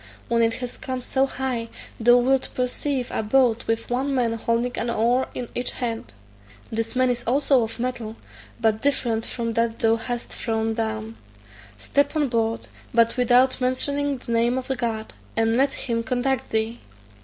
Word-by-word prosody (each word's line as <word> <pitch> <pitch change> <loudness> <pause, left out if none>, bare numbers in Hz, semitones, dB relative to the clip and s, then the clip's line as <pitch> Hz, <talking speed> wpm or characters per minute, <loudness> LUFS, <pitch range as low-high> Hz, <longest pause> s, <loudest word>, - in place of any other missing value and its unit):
When 235 0 +3
it 230 0 +3
has 250 0 -5
come 260 -1 -4
so 265 +2 +1
high, 250 -4 -3 0.3
thou 240 +2 +6
wilt 265 +2 +2
perceive 250 +1 -1
a - - 0
boat 240 +1 +2
with 225 +1 -1
one 270 +3 0
man 240 -3 +2
holding 230 +2 0
an 235 - -1
oar 235 +3 +2
in 245 - -4
each 245 - -2
hand; 230 - -4 0.6
this 225 +2 -2
man 255 0 +3
is 240 -1 -2
also 270 +1 +4
of 225 +1 -3
metal, 235 -3 -3 0.4
but 220 -2 +2
different 235 -5 +1
from 230 -2 -3
that 230 0 0
thou 225 0 +3
hast 240 +1 -4
thrown 225 -1 -1
down; 220 0 -3 0.6
step 285 - +1
on 295 -3 +2
board, 225 -1 0 0.2
but 230 0 +3
without 250 +1 +4
mentioning 280 +2 +1
the 245 -1 -7
name 235 +2 +2
of 260 +1 -3
God, 225 -3 -3 0.2
and 225 0 +3
let 270 +2 +3
him 230 -2 -1
conduct 255 +2 -1
thee. 220 +2 -1
240 Hz, 170 wpm, -24 LUFS, 225-255 Hz, 0.6 s, thou